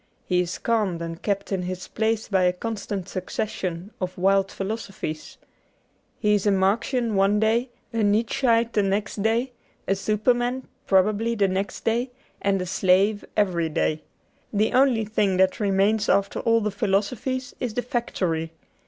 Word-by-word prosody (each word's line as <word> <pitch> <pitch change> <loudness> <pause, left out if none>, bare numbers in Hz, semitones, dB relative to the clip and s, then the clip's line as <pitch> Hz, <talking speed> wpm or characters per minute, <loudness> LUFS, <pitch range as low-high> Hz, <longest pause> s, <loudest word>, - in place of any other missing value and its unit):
He 180 -1 +1
is 180 0 -1
calmed 210 -7 0
and 165 0 -6
kept 200 -1 -2
in 190 -2 0
his 185 0 -5
place 220 0 -1
by 190 -3 +2
a 180 - +3
constant 200 -2 -4
succession 185 -1 -4
of 185 0 -3
wild 195 +1 +2
philo 195 +3 -2
sophies. 190 -8 -7 0.8
He 210 -1 +2
is 205 0 +1
a - - +5
Marxian 225 +5 +1
one 200 +1 +3
day, 230 +4 +2 0.2
a - - -3
Nietzscheite 230 +2 +2
the 210 - +3
next 200 +1 -1
day, 230 +4 +1 0.4
a - - +3
Superman 240 +6 0 0.2
(probably) 210 +4 +2
the 200 -3 +3
next 190 +1 -3
day, 235 +3 +1 0.3
and 195 -1 +1
a 180 - -2
slave 190 +3 +2
every 175 -6 +2
day. 155 0 0 0.5
The 215 +3 +1
only 255 -4 +4
thing 205 -3 +1
that 190 0 +3
remains 205 +1 +2
after 200 0 +2
all 230 0 +3
the 210 0 -1
philosophies 215 +6 -1
is 235 -4 -3
the 245 - 0
factory. 170 -10 -2
205 Hz, 160 wpm, -24 LUFS, 190-225 Hz, 0.8 s, a